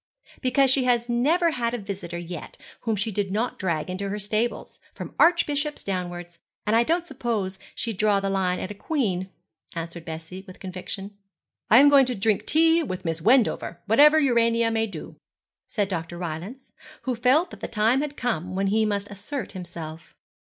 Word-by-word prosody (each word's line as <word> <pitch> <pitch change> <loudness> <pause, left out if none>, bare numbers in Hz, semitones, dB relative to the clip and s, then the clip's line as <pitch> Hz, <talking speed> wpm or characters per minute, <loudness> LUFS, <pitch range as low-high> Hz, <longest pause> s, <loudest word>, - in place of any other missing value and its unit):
'Because 260 0 +3
she 270 - +3 0.3
never 315 +9 +3
had 240 -4 -1
a - - -2
visitor 195 -5 -6
yet 175 -1 -7 0.2
whom 225 -2 -1
she 210 +2 -2
did 200 -1 -1
not 220 +5 -2
drag 170 -5 -1
into 190 +2 -3
her 205 - -2
stables, 215 +3 -2
from - - -7
archbishops 300 -3 +2
downwards; 175 -2 -4 0.3
and 215 +1 +2
I 230 - +6
don't 335 +7 +1
suppose 225 - -3 0.2
she'd 225 -5 -3
draw 210 -1 +3
the 195 - -2
line 185 -2 +1
at 185 - -4
a - - -4
queen,' 200 - -1 0.5
answered 165 0 -5
Bessie, 165 +3 -7
with 185 - -12
conviction. 195 +2 -6 0.5
'I 225 - +8
am 285 - +7
going 275 -2 +6
to 250 - -1
drink 205 0 0
tea 325 +2 +4
with 185 - -5
Miss 165 0 -2
Wendover, 225 -5 +2
whatever 295 +9 +6
Urania 230 -4 +3
may 225 0 +1
do,' 175 -7 -9 0.5
said 205 -3 -1
Dr. 175 -2 -4
Rylance, 180 +10 -6 0.3
who 260 - -1
felt 260 +9 +3
that - - -10
the - - -4
time 225 +5 +2
had 295 -1 -4
come 185 -7 -2
when 195 +1 0
he 220 0 +3
must 205 -1 -2
assert 210 +8 -5
himself. 170 -2 -8
210 Hz, 180 wpm, -25 LUFS, 185-250 Hz, 0.5 s, I